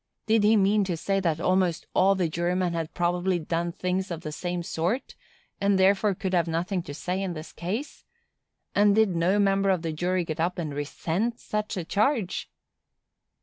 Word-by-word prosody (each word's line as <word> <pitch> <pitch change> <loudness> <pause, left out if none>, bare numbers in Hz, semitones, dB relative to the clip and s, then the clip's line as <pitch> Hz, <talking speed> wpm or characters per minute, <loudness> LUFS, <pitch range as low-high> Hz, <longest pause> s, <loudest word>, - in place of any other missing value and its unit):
Did 220 -1 +3
he 215 +1 +5
mean 205 +1 +3
to 175 -3 -2
say 195 +4 0
that 165 -5 0
almost 180 -1 +1
all 195 +1 +4
the 180 -3 +1
jurymen 175 +2 0
had 165 -2 -4
probably 175 +1 +1
done 170 +1 -2
things 185 +2 -2
of 170 -2 -5
the 155 - -5
same 175 +2 -3
sort, 175 +11 -2 0.5
and 200 -1 +3
therefore 195 +1 +3
could 190 +1 -3
have 170 -2 +2
nothing 175 +3 -1
to 145 - -8
say 180 +4 -2
in 190 -2 -2
this 155 0 -8
case? 210 - -5 0.7
and 205 0 +4
did 215 -5 +3
no 175 +4 +2
member 195 -1 +3
of 185 -3 +1
the 165 -1 -2
jury 180 +2 0
get 160 0 -5
up 175 +2 0
and 155 -4 -3
resent 170 +10 -2
such 210 0 -3
a 175 - -3
charge? 215 - 0
180 Hz, 190 wpm, -26 LUFS, 170-195 Hz, 0.7 s, he